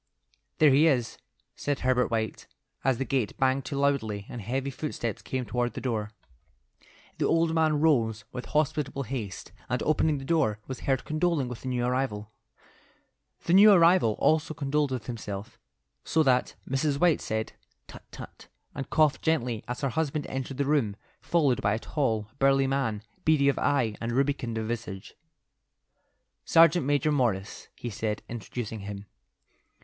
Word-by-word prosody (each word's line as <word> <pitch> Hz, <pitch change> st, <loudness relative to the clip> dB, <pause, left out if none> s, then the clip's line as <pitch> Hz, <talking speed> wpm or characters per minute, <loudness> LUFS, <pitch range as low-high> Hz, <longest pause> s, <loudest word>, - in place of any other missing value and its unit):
"There 150 Hz, -2 st, +6 dB
he 145 Hz, +5 st, +5 dB
is," 125 Hz, -7 st, 0 dB, 0.4 s
said 145 Hz, -1 st, -2 dB
Herbert 125 Hz, -1 st, +2 dB
White, 110 Hz, -1 st, -3 dB, 0.4 s
as 130 Hz, -2 st, +2 dB
the 135 Hz, -, -2 dB
gate 130 Hz, -7 st, -1 dB
banged 130 Hz, 0 st, +1 dB
to 140 Hz, -, -4 dB
loudly 110 Hz, -8 st, 0 dB
and 120 Hz, -, -6 dB
heavy 130 Hz, +6 st, -2 dB
footsteps 130 Hz, -6 st, -4 dB
came 130 Hz, -1 st, -3 dB
toward 120 Hz, +1 st, -1 dB
the -, -, -5 dB
door. 110 Hz, -5 st, -2 dB, 1.1 s
The -, -, +2 dB
old 165 Hz, 0 st, +2 dB
man 155 Hz, -2 st, +2 dB
rose 115 Hz, -9 st, +2 dB
with 125 Hz, -, -6 dB
hospitable 150 Hz, -2 st, 0 dB
haste, 110 Hz, -7 st, -6 dB, 0.2 s
and 125 Hz, 0 st, -1 dB
opening 155 Hz, -1 st, +2 dB
the 135 Hz, -, -7 dB
door, 140 Hz, -9 st, +1 dB
was 130 Hz, -, -6 dB
heard 135 Hz, -2 st, -1 dB
condoling 155 Hz, -3 st, 0 dB
with 125 Hz, -, -7 dB
the -, -, -7 dB
new 125 Hz, -1 st, 0 dB
arrival. 125 Hz, -4 st, -2 dB, 1.1 s
The 170 Hz, -, 0 dB
new 205 Hz, +3 st, +9 dB
arrival 170 Hz, -, +5 dB
also 155 Hz, +5 st, +1 dB
condoled 145 Hz, 0 st, 0 dB
with 125 Hz, -4 st, -4 dB
himself, 105 Hz, -4 st, -6 dB, 0.4 s
so 160 Hz, -, +2 dB
that 125 Hz, -3 st, +2 dB
Mrs. 140 Hz, +2 st, 0 dB
White 175 Hz, -3 st, +3 dB
said, 110 Hz, 0 st, -3 dB, 0.3 s
"Tut, -, -, -12 dB
tut!" -, -, -11 dB, 0.3 s
and 135 Hz, -2 st, -6 dB
coughed 155 Hz, -2 st, +3 dB
gently 125 Hz, -9 st, 0 dB
as 125 Hz, 0 st, -4 dB
her 140 Hz, -, 0 dB
husband 150 Hz, +1 st, -1 dB
entered 135 Hz, 0 st, -4 dB
the 140 Hz, -, 0 dB
room, 135 Hz, -9 st, +1 dB, 0.3 s
followed 145 Hz, -8 st, +2 dB
by 100 Hz, +1 st, +2 dB
a -, -, -2 dB
tall, 115 Hz, -7 st, -1 dB
burly 135 Hz, 0 st, +4 dB
man, 130 Hz, -6 st, -1 dB, 0.2 s
beady 150 Hz, -3 st, +4 dB
of 140 Hz, -, 0 dB
eye 130 Hz, -7 st, +1 dB
and 115 Hz, +1 st, -2 dB
rubicund 135 Hz, -3 st, 0 dB
of 110 Hz, -1 st, -2 dB
visage. 110 Hz, -5 st, -5 dB, 1.3 s
"Sergeant 165 Hz, -2 st, +5 dB
Major 145 Hz, +1 st, +2 dB
Morris," 115 Hz, -9 st, -1 dB
he 120 Hz, -, -6 dB
said, 105 Hz, 0 st, -3 dB
introducing 115 Hz, 0 st, -6 dB
him. 100 Hz, 0 st, -7 dB
130 Hz, 160 wpm, -27 LUFS, 115-150 Hz, 1.3 s, new